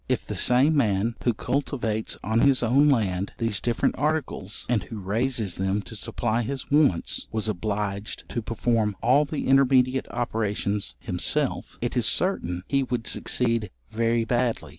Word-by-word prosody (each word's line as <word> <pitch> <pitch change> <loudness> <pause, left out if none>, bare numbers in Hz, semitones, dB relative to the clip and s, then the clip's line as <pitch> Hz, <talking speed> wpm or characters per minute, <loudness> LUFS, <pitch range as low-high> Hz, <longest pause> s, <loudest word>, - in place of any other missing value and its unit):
If - - 0
the - - -5
same 135 +6 +3
man 110 -4 +2
who 120 - +3
cultivates 120 -5 -2
on 110 +2 +1
his 135 0 +4
own 135 +6 +4
land 100 -7 0
these 115 -4 -1
different 120 -1 +1
articles, 145 -9 -2
and 120 -4 +1
who 110 +5 -8
raises 110 +1 -1
them 95 +2 0
to 110 - -10
supply 115 +2 -1
his 135 +4 -5
wants, 145 - +2
was 110 -1 -1
obliged 105 +1 -3
to 120 - -2
perform 110 -1 0
all 135 +6 +4
the 150 +1 -4
intermediate 130 -1 +3
operations 105 -4 -2
himself, - - -2
it - - -2
is - - +2
certain 90 +1 -1
he 140 -1 +2
would 125 -3 -2
succeed 115 -4 0 0.2
very 115 +1 +1
badly. 120 0 0
115 Hz, 155 wpm, -25 LUFS, 105-130 Hz, 0.2 s, his